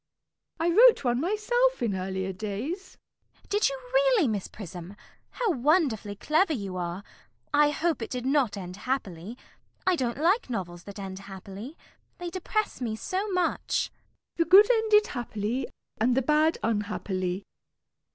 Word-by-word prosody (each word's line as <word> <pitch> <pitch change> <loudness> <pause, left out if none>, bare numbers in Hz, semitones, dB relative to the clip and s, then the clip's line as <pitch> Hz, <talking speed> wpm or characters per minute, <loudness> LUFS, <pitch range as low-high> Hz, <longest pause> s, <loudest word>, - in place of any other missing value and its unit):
I 335 +1 +2
wrote 460 0 +7
one 245 0 +1
myself 455 - +1
in 220 -4 +1
earlier 190 0 -3
days. 220 - -5 0.4
CECILY. - - -28
Did 415 +4 +3
you - - -5
really, - - +4
Miss 210 -4 -2
Prism? 180 -1 -9 0.3
How 475 -5 0
wonderfully 265 - +1
clever 315 - +2
you 200 -8 -4
are! 175 +2 -4 0.5
I 295 0 +5
hope 315 -1 -1
it 225 - -4
did 250 -1 -4
not 265 -6 +2
end 180 -1 -7
happily? 210 -4 -4 0.5
I 370 - +4
don't 250 -6 -2
like 355 - +2
novels 175 -6 -5
that 200 0 -9
end 190 -1 -6
happily. 195 - -9 0.4
They 350 -1 -5
depress 395 -1 -2
me 225 -3 -2
so 380 - -3
much. 360 -3 +1
MISS - - -1
PRISM. - - -43
The 335 - +3
good 410 +5 +8
ended 435 -2 +4
happily, 235 0 -3 0.3
and 245 +3 +2
the 265 - +3
bad 305 +4 +3
unhappily. 200 -4 -2
255 Hz, 155 wpm, -27 LUFS, -, 0.5 s, good